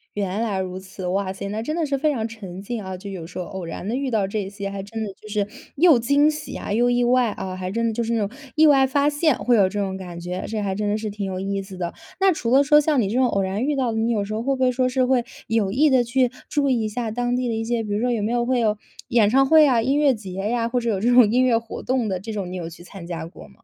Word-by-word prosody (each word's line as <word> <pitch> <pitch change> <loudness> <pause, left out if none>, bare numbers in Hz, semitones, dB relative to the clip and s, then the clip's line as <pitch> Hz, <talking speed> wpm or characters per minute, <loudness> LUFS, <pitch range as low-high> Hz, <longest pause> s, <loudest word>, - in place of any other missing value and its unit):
原 200 +1 -2
来 205 -4 -1
如 185 0 -4
此， 190 -1 -7
哇 190 +1 -1
塞， 195 +1 -6
那 215 +2 -3
真 305 +6 -3
的 330 -2 0
是 275 -1 -1
非 305 +2 +1
常 230 -4 -2
沉 195 -5 -9
浸 220 0 -5
啊， 190 -1 -6
就 200 +2 -8
有 180 -4 -6
时 175 +2 -8
候 180 - -3
偶 190 0 -7
然 165 +3 -6
地 235 - -1
遇 270 -1 -2
到 205 -4 +1
这 200 -1 -3
些， 200 -1 -5
还 195 -1 -5
真 220 +2 -6
的 205 -3 -4
就 215 - -15
是 205 -1 -1 0.3
又 320 -4 +6
惊 280 +5 +3
喜 305 0 -5
啊， 200 - -4
又 240 +2 +3
意 245 0 +2
外 245 -1 +3
啊， 185 -2 -5
还 185 0 -4
真 230 +2 0
的 225 - -1
就 235 - -1
是 230 - -2
那 230 - +1
种， - - -13 0.3
意 315 0 +6
外 270 -2 +6
发 285 +2 +2
现 295 0 +2
会 245 -1 +2
有 195 -3 +4
这 205 +1 -4
种 190 -1 -2
感 180 -2 -8
觉， 180 +1 -5
这 220 -1 -2
还 195 -2 -2
真 210 +1 -1
的 210 - +1
是 215 -1 -4
挺 205 0 -4
有 185 -1 -4
意 195 +1 -2
思 190 -1 -10
的。 175 -1 -3 0.3
那 385 -2 +4
除 240 -6 -3
了 275 - +7
说， 300 0 +6
像 295 -3 +2
你 205 - +1
这 220 - -3
种 260 - +4
偶 200 -4 0
然 195 +5 -2
遇 295 -1 0
到 245 -4 0
的， - - -2
你 225 +2 +1
有 205 -3 0
时 215 - -5
候 220 - -2
会 270 0 0
不 - - -6
会 255 - +4
说 255 0 +1
是 255 0 +1
会 250 -2 +2 0.2
有 215 -4 +1
意 295 +7 +4
地 260 -3 +4
去 245 +1 +1 0.2
注 290 -2 +1
意 240 -3 +2
一 215 - -1
下 225 0 -3
当 245 +1 -1
地 250 -1 -1
的 230 - -1
一 225 - -2
些， 235 0 -1
比 210 -2 -4
如 210 - 0
说， 245 0 +1
有 225 -3 0
没 220 +3 -1
有 240 0 +1
会 255 -1 +1
有 215 -2 +1 0.3
演 230 -5 +3
唱 270 +3 +4
会 315 0 +7
啊， 245 -5 +3
音 270 +5 +1
乐 290 -3 +4
节 195 -5 -8
呀， 230 +5 -1
或 245 +1 -1
者 235 - -1
有 200 -4 0
这 235 +4 +1
种 240 -4 +6
音 255 +1 +3
乐 235 -3 +4
活 230 0 -6
动 250 -4 0
的， 185 -1 -2
这 220 +3 -6
种 190 -3 -4
你 185 - -5
有 165 -1 -5
去 170 +1 -13
参 180 -1 -10
加 170 -2 -5
过 165 - -12
么？ - - -17
225 Hz, 350 characters per minute, -23 LUFS, 195-255 Hz, 0.3 s, 了